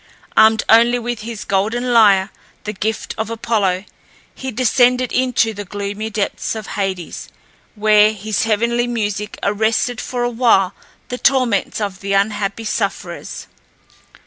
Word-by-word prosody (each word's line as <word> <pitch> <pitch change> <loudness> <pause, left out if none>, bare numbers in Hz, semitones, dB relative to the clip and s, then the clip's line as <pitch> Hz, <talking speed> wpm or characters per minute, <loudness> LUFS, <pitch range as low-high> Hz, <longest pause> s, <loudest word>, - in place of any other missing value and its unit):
Armed 220 0 +5
only 235 +2 +5
with 240 -1 -4
his 225 -1 -7
golden 225 +6 0
lyre, 200 -4 +5 0.3
the 210 - -4
gift 220 +2 -3
of 220 0 -2
Apollo, 210 -5 0 0.5
he 265 - -6
descended 250 +1 +2
into 250 -3 +1
the 205 0 -6
gloomy 205 +2 -5
depths 210 +1 -2
of 220 -1 -6
Hades, 190 -5 -4 0.5
where 215 0 +5
his 215 0 -2
heavenly 235 +2 +1
music 210 -3 -3
arrested 220 +3 0
for 245 -1 -3
a 240 - 0
while 225 -6 +3 0.4
the 250 - -4
torments 255 -8 +1
of 200 -3 -3
the 200 0 -3
unhappy 200 +1 0
sufferers. 215 - -4
220 Hz, 135 wpm, -18 LUFS, 205-235 Hz, 0.5 s, Armed